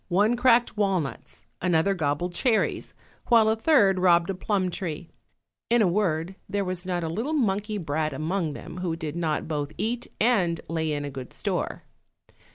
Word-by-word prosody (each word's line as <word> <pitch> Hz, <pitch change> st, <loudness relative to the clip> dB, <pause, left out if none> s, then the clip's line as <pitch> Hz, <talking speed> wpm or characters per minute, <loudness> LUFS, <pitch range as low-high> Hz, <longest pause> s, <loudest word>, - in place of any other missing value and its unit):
One 205 Hz, +6 st, +3 dB
cracked 240 Hz, -1 st, +3 dB
walnuts, 190 Hz, -9 st, -2 dB, 0.2 s
another 180 Hz, +2 st, +2 dB
gobbled 160 Hz, +1 st, -1 dB
cherries, 225 Hz, +3 st, 0 dB, 0.3 s
while 230 Hz, -2 st, +5 dB
a 220 Hz, -, +3 dB
third 220 Hz, -7 st, +4 dB
robbed 175 Hz, 0 st, +4 dB
a -, -, -2 dB
plum 185 Hz, -1 st, -1 dB
tree; 170 Hz, -2 st, -5 dB, 0.6 s
in 235 Hz, -1 st, +4 dB
a -, -, +4 dB
word, 175 Hz, -2 st, 0 dB, 0.2 s
there 200 Hz, -1 st, -1 dB
was 180 Hz, 0 st, -3 dB
not 175 Hz, -2 st, -1 dB
a -, -, -1 dB
little 225 Hz, -, -2 dB
monkey 210 Hz, -6 st, 0 dB
brat 155 Hz, -3 st, -1 dB
among 155 Hz, +3 st, -2 dB
them 165 Hz, -, -9 dB
who 180 Hz, -2 st, -2 dB
did 155 Hz, -2 st, -5 dB
not 160 Hz, -3 st, -1 dB
both 150 Hz, -2 st, -3 dB
eat 235 Hz, +2 st, -2 dB
and 190 Hz, -8 st, +2 dB
lay 160 Hz, -1 st, -1 dB
in 145 Hz, -1 st, -2 dB
a 145 Hz, -, -5 dB
good 130 Hz, -2 st, -8 dB
store. -, -, -3 dB
180 Hz, 170 wpm, -26 LUFS, 160-210 Hz, 0.6 s, while